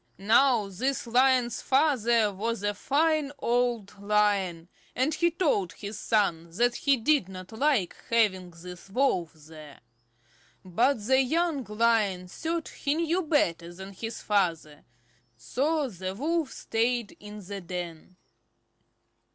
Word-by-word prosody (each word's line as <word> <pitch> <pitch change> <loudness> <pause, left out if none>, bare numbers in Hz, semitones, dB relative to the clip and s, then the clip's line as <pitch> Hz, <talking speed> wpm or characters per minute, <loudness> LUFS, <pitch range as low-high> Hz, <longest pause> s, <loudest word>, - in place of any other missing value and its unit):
Now 230 +1 +3
this 255 +9 -2
Lion's 250 0 +2
father 240 -6 +2
was 225 +2 -3
a 205 0 0
fine 300 +5 +1
old 235 -5 -1
Lion, 200 -5 +1 0.3
and 265 +5 +1
he 340 +3 +2
told 290 - 0
his 205 +4 -7
son 170 -6 0
that 240 +1 +3
he 275 +2 +2
did 240 -4 +2
not 185 0 -9
like 225 - +1
having 200 -6 +2
this 180 +2 -11
Wolf 195 - 0
there. 155 -1 -14 0.8
But 230 +5 +1
the 260 +3 +4
young 315 +1 0
Lion 210 -4 +1
thought 325 - -4
he 285 +1 -2
knew 335 +2 0
better 175 - 0
than 190 +3 -10
his 225 +4 -6
father, 165 -7 -1 0.5
so 280 - -1
the 190 -3 -6
Wolf 315 +4 -1
stayed 235 0 -1
in 210 -1 -10
the 200 +1 -6
den. 175 -1 -7
220 Hz, 125 wpm, -27 LUFS, 185-270 Hz, 0.8 s, the